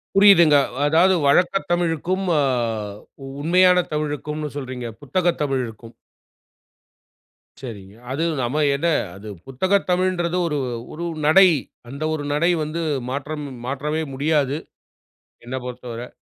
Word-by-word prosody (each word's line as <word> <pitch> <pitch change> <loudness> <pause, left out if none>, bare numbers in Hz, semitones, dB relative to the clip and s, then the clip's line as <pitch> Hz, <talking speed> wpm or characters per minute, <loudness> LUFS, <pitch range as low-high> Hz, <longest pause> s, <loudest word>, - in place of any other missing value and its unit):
புரியுதுங்க. 195 -6 +7 0.3
அதாவது 170 +5 +4
வழக்க 175 +7 +3 0.2
தமிழுக்கும், 175 +2 0 0.2
அ - - +3 1.0
உண்மையான 180 +3 +4
தமிழுக்கும்னு 150 0 -3
சொல்றீங்க, 125 -3 -5
புத்தகத் 175 +4 0
தமிழுக்கும். 120 -5 -3 1.7
சரிங்க. 105 -5 -9 0.2
அது 150 +5 -1 0.2
நம்ம 125 +5 -1 0.2
என்ன 160 +5 -1 0.3
அது 100 +3 -11 0.2
புத்தகத் 185 +11 0
தமிழ்ன்றது 180 -1 +1
ஒரு 150 -2 -1 0.4
ஒரு 170 +3 -5 0.2
நடை. 185 +4 +7 0.4
அந்த 140 +4 -6
ஒரு 150 -2 -3
நடை 170 +4 +2
வந்து 155 +3 -4 0.3
மாற்றம் 145 +2 -4 0.2
மாற்றவே 145 +4 -2
முடியாது 145 0 +1 0.9
என்ன 125 +2 -7
பொறுத்தவரை. 125 -1 -7
150 Hz, 105 wpm, -22 LUFS, 135-175 Hz, 1.7 s, புரியுதுங்க